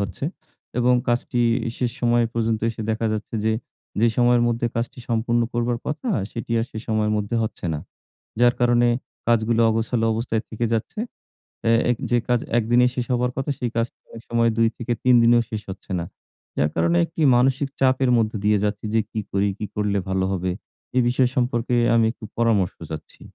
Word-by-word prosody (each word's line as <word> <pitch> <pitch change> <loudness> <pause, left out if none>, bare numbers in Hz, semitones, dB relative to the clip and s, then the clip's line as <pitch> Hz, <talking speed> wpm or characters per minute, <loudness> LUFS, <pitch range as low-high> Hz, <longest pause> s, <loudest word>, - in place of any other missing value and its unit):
হচ্ছে। 100 +4 -4 0.5
এবং 125 +1 +4
কাজটি 120 0 0 0.4
শেষ 125 -2 0
সময় 120 -1 +3
পর্যন্ত 115 -1 0
এসে 115 0 -6
দেখা 110 +1 0
যাচ্ছে 110 +2 -5
যে, 110 - +3 0.5
যে 115 - +5
সময়ের 120 -1 +4
মধ্যে 120 0 0
কাজটি 120 +3 -3
সম্পূর্ণ 120 +1 +1
করবার 120 0 0
কথা 155 - -3 0.2
সেটি 115 0 -5
আর - - 0
সেই 110 - -6
সময়ের 110 -1 +1
মধ্যে 105 +2 -1
হচ্ছে 110 - -4
না। 75 - -4 0.6
যার 120 0 +5
কারণে 120 0 +4 0.4
কাজগুলো 115 0 +2
অগোছালো 115 +1 0
অবস্থায় 115 0 -1
থেকে 115 +2 -2
যাচ্ছে। 115 - -2 0.7
অ্যা 115 - +3 0.2
এক 120 - -1
যে 120 - +4
কাজ 120 -1 +2 0.2
একদিনে 120 +2 +4
শেষ 125 - -1
হবার 125 +1 +1
কথা 135 +2 -1
সেই 125 - -1
কাজটি 115 +1 -1
অনেক 115 - -10
সময় 115 0 +3
২-৩ 120 +2 +2
দিনেও 120 0 +5
শেষ 110 -1 -4
হচ্ছে 95 +1 -9
না। 85 - -3 0.5
যার 75 - +2
কারণে 85 +1 +2
একটি 160 - -6
মানসিক 135 +3 +2
চাপের 130 0 +3
মধ্যে 110 -1 0
দিয়ে 105 0 +4
যাচ্ছি 105 0 -2
যে, 115 - +4
"কী 110 - -3
করি? 100 +1 +1
কী 105 - -4
করলে 105 -1 0
ভালো 95 0 +1
হবে?" 90 -1 -1 0.5
এই 125 - +5
বিষয় 125 0 +2
সম্পর্কে 120 -1 0 0.2
আমি 115 -1 +4
একটু 115 - -18
পরামর্শ 110 -6 +2 0.2
চাচ্ছি। 80 - -8
115 Hz, 180 wpm, -23 LUFS, 110-120 Hz, 0.7 s, যে